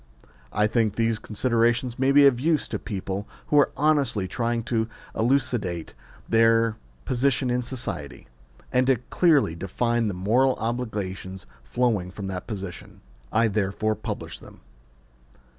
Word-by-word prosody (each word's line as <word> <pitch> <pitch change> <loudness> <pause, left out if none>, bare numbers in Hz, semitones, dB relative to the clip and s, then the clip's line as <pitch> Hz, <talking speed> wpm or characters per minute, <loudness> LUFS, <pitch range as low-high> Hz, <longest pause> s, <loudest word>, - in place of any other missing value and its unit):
I 105 +1 +2
think 110 -2 +1
these 115 -1 +1
considerations 120 +2 0
may 135 +1 +3
be 145 0 +7
of 130 -4 +5
use 155 +2 +1
to - - -3
people 100 -1 -4 0.2
who 150 - +5
are 145 - +4
honestly 140 -10 +2
trying 115 +4 -1
to 115 -1 -1 0.3
elucidate 115 - 0 0.3
their 115 0 +4 0.3
position 130 0 +1
in 125 0 +1
society, 120 - -6 0.5
and 125 0 +3
to 135 - +5
clearly 140 - +2
define 115 +7 -1
the 100 - -2
moral 120 +8 +2
obligations 105 -6 -4 0.2
flowing 105 - 0
from 95 +2 -7
that 90 -1 -5
position. 100 -5 -7 0.3
I 110 +1 +3
therefore 105 +1 0
publish - - -6
them. - - -15
115 Hz, 135 wpm, -25 LUFS, 100-125 Hz, 0.5 s, be